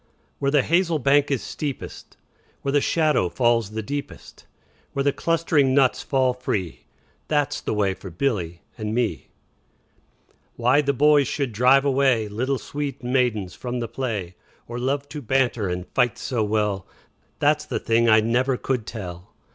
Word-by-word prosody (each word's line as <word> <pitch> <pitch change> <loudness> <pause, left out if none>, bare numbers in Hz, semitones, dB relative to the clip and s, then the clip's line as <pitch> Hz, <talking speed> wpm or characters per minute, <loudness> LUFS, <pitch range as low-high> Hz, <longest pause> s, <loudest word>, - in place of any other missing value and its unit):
Where 140 - +1
the 140 -2 +3
hazel 170 0 +2
bank 140 +1 +3
is 135 -4 -1
steepest, 145 -3 -6 0.5
Where 140 - 0
the 145 0 +3
shadow 150 - +2
falls 120 0 +1
the 110 +1 -5
deepest, 140 +5 -7 0.5
Where 140 - 0
the 140 0 +2
clustering 160 -5 +2
nuts 135 -2 +3
fall 130 -2 +1
free, 105 -8 -2
15 - - -26 0.4
That 145 -3 +1
's - - -5
the - - -2
way 100 -2 +1
for 95 0 -10
Billy 85 -4 -2 0.2
and 110 0 -3
me. 120 -2 -1 1.3
Why 125 +5 +3
the 140 -1 +1
boys 145 0 +4
should 140 -1 -2
drive 130 +5 +4
away 135 -5 +2
Little 130 +6 -1
sweet 140 -1 -5
maidens 120 -7 0
from 125 0 -4
the 120 - -3
play, 110 -9 -4 0.3
Or 120 +1 -5
love 140 +3 -1
to 150 0 -6
banter 120 -5 +1
and 90 0 -3
fight 125 -1 +2
so 120 -4 -1
well, 105 -2 -1 0.5
That 150 +1 +2
's - - -10
the - - -3
thing 115 +1 +2
I 110 0 +6
never 125 +4 +1
could 125 -4 -2
tell. 90 -4 -8
125 Hz, 170 wpm, -23 LUFS, 110-140 Hz, 1.3 s, I